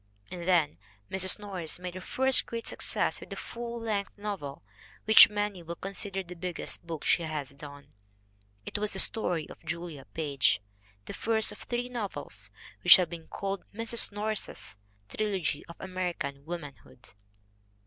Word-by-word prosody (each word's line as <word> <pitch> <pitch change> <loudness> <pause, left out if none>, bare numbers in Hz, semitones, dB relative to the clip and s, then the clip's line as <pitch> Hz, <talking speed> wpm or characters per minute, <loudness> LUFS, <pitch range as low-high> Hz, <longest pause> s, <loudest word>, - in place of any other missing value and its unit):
And 175 -1 -6
then 165 - +3 0.3
Mrs. 190 -1 +6
Norris 190 -6 -1
made 180 0 -6
her 185 - -7
first 265 +6 +3
great 230 0 -5
success - - +1
with - - -12
a - - -5
full 235 0 -6
length 210 -3 -3
novel 195 - -5 0.4
which 220 +1 +10
many 205 -3 -2
will 170 0 -6
consider 195 +1 -3
the 180 0 -10
biggest 175 -1 -4
book 165 -3 -5
she - - +4
has 155 -4 -4
done. 140 0 -12 0.7
It - - -4
was 210 0 -1
The 190 - -1
Story 175 -7 +3
of - - -13
Julia 165 -4 -5
Page, 145 -5 +2 0.5
the - - -7
first 220 -1 +2
of 210 - -12
three 245 0 -3
novels 235 -5 -6 0.3
which - - +12
have 180 -2 +1
been 165 -2 -8
called 195 0 -4
Mrs. 230 0 +3
Norris's 205 - -3 0.3
trilogy 190 - -2
of 170 - -10
American 175 -7 -4
womanhood. 145 - -9
185 Hz, 155 wpm, -29 LUFS, 160-210 Hz, 0.7 s, which